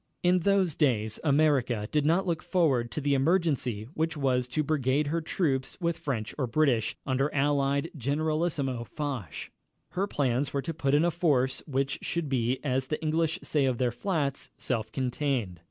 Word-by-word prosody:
In 180 +1 +4
those 190 -2 +2
days 110 -8 +1
America 140 -7 +2
did 150 -1 +2
not 175 +4 +3
look 170 -3 -1
forward 140 -10 +1
to 150 - -4
the 145 0 +1
emergency 140 - +1
which 160 0 -1
was 130 -3 +1
to 140 +5 -1
brigade 145 -1 +1
her 165 +3 -1
troops 145 -5 -1
with 170 -2 0
French 115 -7 -3
or 130 - +1
British, 120 -5 +2
under 135 +2 +1
Allied 140 +1 +1
Generalissimo 145 -2 -1
Foch. 130 - -5 0.4
Her 195 +2 -1
plans 135 -3 0
were 140 - +1
to 165 - -3
put 140 -2 +1
in 150 +3 +4
a 175 - +2
force 135 -6 +1
which 135 0 -1
should 170 -4 -2
be, 125 -1 +1
as 130 -2 0
the 155 - -2
English 160 +2 +1
say 145 -3 +1
of 130 -2 +1
their 125 -1 +1
flats, 140 - -2
"self 110 -4 -2
contained." 125 - -1
140 Hz, 170 wpm, -28 LUFS, 130-155 Hz, 0.4 s, In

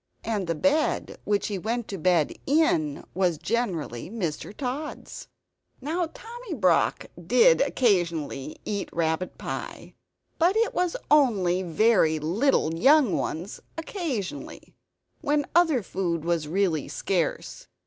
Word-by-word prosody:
And 210 -5 -2
the 165 - 0
bed 290 - 0
which 205 -1 +1
he 200 -3 -3
went 230 +4 -2
to 195 - -5
bed 170 -2 +2
in 315 0 +2
was 180 -3 +1
generally 175 - -2
Mr. 185 -8 -4
Tod's. 275 +6 -6 0.5
Now 325 +6 -1
Tommy 470 -5 -8
Brock 185 - +2 0.2
did 470 - +5
occasionally 170 - 0
eat 205 -2 -3
rabbit 165 +2 -1
pie; - - -6 0.5
but 355 +6 +3
it 460 - +2
was 360 -1 0
only 200 -12 +4
very 180 -2 +3
little 170 - +1
young 265 - +4
ones 175 +7 -4 0.2
occasionally, 325 - -5 0.5
when 290 0 +1
other 325 - +4
food 170 -4 -2
was 170 -3 0
really 170 -3 0
scarce. 180 -4 -2
205 Hz, 120 wpm, -26 LUFS, -, 0.5 s, did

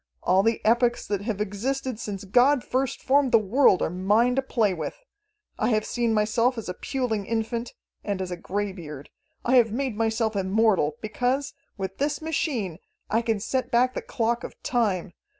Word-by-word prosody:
All 185 +2 +4
the 225 +2 0
epochs 240 +2 +3
that 200 -2 -2
have 210 -1 -3
existed 240 +4 -2
since 200 -4 -5
God 245 +7 +4
first 260 0 -2
formed 270 0 +3
the - - +7
world 215 -1 +3
are - - 0
mine 210 +7 +2
to 270 - +2
play 225 -7 +1
with! 160 -3 -4 0.6
I 220 - +2
have 215 -2 +1
seen 240 -2 0
myself 225 +4 +2
as 225 - -5
a 180 - -3
puling 225 -2 -2
infant, 230 +1 -2 0.3
and 200 -2 -2
as 185 -1 -4
a - - -2
greybeard. 175 -6 -5 0.3
I 255 +2 +4
have 230 -3 +4
made 255 0 -2
myself 225 0 0
immortal, 195 -5 +2
because, 255 +5 -1 0.2
with 190 -1 -5
this 285 +1 0
machine, 270 - -2 0.3
I 225 - +3
can 225 -2 0
set 255 +5 -2
back 250 +2 +3
the - - -3
clock 235 +1 -1
of - - -7
time. 200 -7 0
225 Hz, 180 wpm, -25 LUFS, 200-250 Hz, 0.6 s, the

